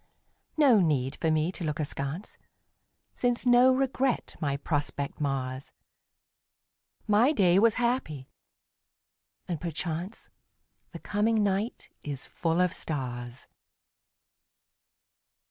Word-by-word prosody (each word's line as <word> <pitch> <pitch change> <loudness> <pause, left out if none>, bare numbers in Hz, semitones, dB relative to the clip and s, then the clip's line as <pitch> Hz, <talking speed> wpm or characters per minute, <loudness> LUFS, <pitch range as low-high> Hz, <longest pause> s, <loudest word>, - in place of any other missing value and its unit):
No 270 -8 +6
need 140 -7 +1
for 160 - 0
me 155 +2 +1
to 185 - -7
look 155 0 -2
askance, 145 +5 -4 0.8
Since 245 0 -1
no 245 +1 +6
regret 265 -1 0
my 140 -2 0
prospect 145 -1 -3
mars. 135 -2 -3 1.4
My 220 +6 +4
day 190 - +4
was 225 +1 +4
happy 235 - -1 1.2
and 170 -4 -3
perchance 170 +3 -4 0.6
The - - -7
coming 215 +1 +1
night 200 +4 -2
is 140 -3 -6
full 165 +1 0
of 180 -1 +2
stars. 125 -4 -5
170 Hz, 100 wpm, -28 LUFS, 145-225 Hz, 1.4 s, No